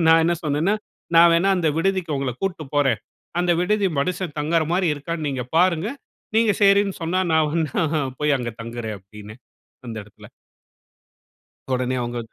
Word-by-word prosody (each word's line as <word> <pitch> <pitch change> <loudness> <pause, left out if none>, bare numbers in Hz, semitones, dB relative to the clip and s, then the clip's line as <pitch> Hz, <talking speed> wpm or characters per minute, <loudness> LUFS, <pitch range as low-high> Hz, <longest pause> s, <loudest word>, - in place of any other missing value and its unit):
நான் 165 0 +6
என்ன 175 - +2
சொன்னேன்னா, 155 +7 +1 0.4
நான் 170 0 +8
வேணா 170 +4 +3
அந்த 165 -3 +1
விடுதிக்கு 185 -3 0
உங்கள 135 -2 -2
கூட்டு 175 -5 -2
போறேன். 135 -7 +2 0.4
அந்த 175 0 +1
விடுதி 205 +1 +2
மனுஷன் 180 0 -3
தங்கற 160 +2 +2
மாரி 185 -1 +2
இருக்கான்னு 155 +2 -4
நீங்க 130 -3 -3
பாருங்க. 180 +1 +3 0.5
நீங்க 225 -2 +4
சரின்னு 200 0 +4
சொன்னா 175 +3 0
நான் 160 -1 +3
வேனா 160 0 0 0.4
போய் 150 -2 +3
அங்க 120 -2 -4
தங்குறேன் 115 -2 -5
அப்படின்னு 105 +3 -12 0.5
அந்த 115 - -6
இடத்தில. 105 - -16 1.5
உடனே 125 0 -1
அவங்க 120 0 -3
160 Hz, 150 wpm, -22 LUFS, 130-180 Hz, 1.5 s, நான்